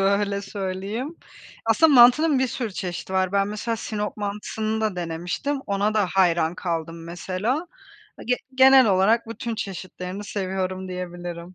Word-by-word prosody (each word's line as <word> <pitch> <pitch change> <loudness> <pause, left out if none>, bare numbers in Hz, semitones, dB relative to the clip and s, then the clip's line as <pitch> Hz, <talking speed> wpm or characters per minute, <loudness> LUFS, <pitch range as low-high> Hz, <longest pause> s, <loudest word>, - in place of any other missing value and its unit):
öyle 200 +1 +1
söyleyeyim. 200 - -4 0.5
Aslında, 320 -2 +4
mantının 265 +5 +7
bir 260 - +2
sürü 235 -3 -4
çeşidi 185 -1 -5
var. 185 0 +1
Ben 200 0 +2
mesela 220 +2 -3
Sinop 210 -1 -4
mantısını 215 +1 -3
da 215 -4 -1
denemiştim, 175 - -3
ona 200 +2 0
da 210 -3 +3
hayran 170 -3 +3
kaldım 165 -2 -4
mesela. 185 - -2 0.5
A, - - -9
ge 250 +1 +1 0.2
genel 265 -1 +7
olarak 215 +4 +3
bütün 230 0 -4
çeşitlerini 185 -1 -6
seviyorum, 190 -2 -3
diyebilirim. 175 -1 -6
200 Hz, 140 wpm, -24 LUFS, 185-225 Hz, 0.5 s, mantının